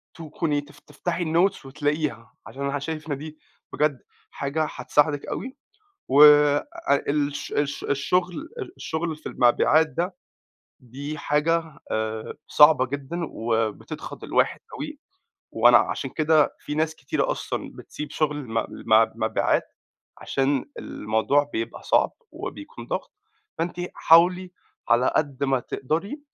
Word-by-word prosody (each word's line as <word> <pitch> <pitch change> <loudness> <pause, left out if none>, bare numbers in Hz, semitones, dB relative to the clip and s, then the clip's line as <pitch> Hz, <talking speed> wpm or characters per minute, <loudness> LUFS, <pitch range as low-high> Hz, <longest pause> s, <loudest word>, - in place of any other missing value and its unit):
تكوني 155 -2 -2
تف 145 0 -17
تفتحي 175 +3 -4
الnotes 170 +1 +1
وتلاقيها 145 -4 -2
عشان 140 - -7
أنا 140 0 -1
شايف 155 +1 -5
إن 140 - -1
دي 155 +1 -9 0.3
بجد 145 -4 +1 0.3
حاجة 150 +3 -2
هتساعدِك 150 -1 +1
أوي، 260 +2 -5 0.5
وآآ 145 - +7 0.4
الش 145 -1 -1
الش 145 -1 -1
الشغل 175 +6 0 0.2
ال 390 -5 -6
الشغل 160 -1 -3
في 155 - -8
المبيعات 150 +6 +4
ده 175 +6 -3 0.6
دي 140 +5 -7
حاجة 155 +1 0
آآ 110 0 -3
صعبة 150 -3 +6
جدًا 140 +5 -5
وبتضغط 115 -2 -3
الواحد - - +1 0.2
أوي، - - -6 0.5
وأنا - - +6
عشان 135 - -2
كده 155 -1 +3
في 150 - -5
ناس 160 +1 0
كتيرة 135 - -1
أصلًا - - -4
بتسيب 150 0 -8
شغل 150 -2 0
م 115 0 -1
م 110 0 +3
مبيعات - - +1 0.5
عشان 135 0 0
الموضوع 125 +7 0
بيبقى 115 +1 -4
صعب - - +2 0.2
وبيكون - - -8
ضغط، - - -4 0.5
فأنتِ 170 +2 -2 0.2
حاولي 180 +2 +4 0.4
على 120 +2 +3
قد 140 -2 0
ما 135 -2 +1
تقدري 170 - -3
150 Hz, 125 wpm, -24 LUFS, 135-160 Hz, 0.6 s, وآآ